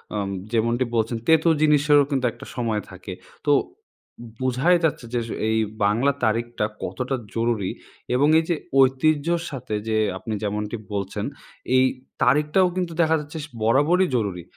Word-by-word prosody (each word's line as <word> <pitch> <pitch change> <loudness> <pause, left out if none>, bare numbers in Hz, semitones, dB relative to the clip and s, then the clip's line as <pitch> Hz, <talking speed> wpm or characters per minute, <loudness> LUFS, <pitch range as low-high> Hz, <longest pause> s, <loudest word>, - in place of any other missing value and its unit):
আম" 100 -1 -2 0.2
যেমনটি 115 +2 +1
বলছেন, 115 +1 0
"তেঁতো 160 +1 +5
জিনিসেরও 150 -1 +5
কিন্তু 130 -2 0
একটা - - -12
সময় 115 -4 -1
থাকে।" 95 0 -8 0.3
তো - - +5 0.7
উম 120 - -9
বোঝাই 130 +8 +3
যাচ্ছে 145 -6 0
যে, 120 - +1
আস 115 - -9 0.2
এই 110 - +2 0.3
বাংলা 120 +8 +3
তারিখটা 115 0 0 0.2
কতটা 125 +9 -2 0.2
জরুরি 115 -4 0 0.4
এবং 145 +3 +4
এই 160 - -2
যে 170 - +2 0.2
ঐতিহ্যর 155 +5 +3
সাথে 120 -5 -4
যে 110 -1 +1 0.2
আপনি 110 +3 -5
যেমনটি 105 +2 -2 0.2
বলছেন, 100 -1 -3 0.5
এই 130 0 +5 0.4
তারিখটাও 150 +8 +3
কিন্তু 180 -3 -2
দেখা 160 0 +3
যাচ্ছে 150 +2 -8
স - - -14
বরাবরই 145 +11 +3
জরুরি। 100 -7 -2
125 Hz, 150 wpm, -23 LUFS, 110-150 Hz, 0.7 s, তেঁতো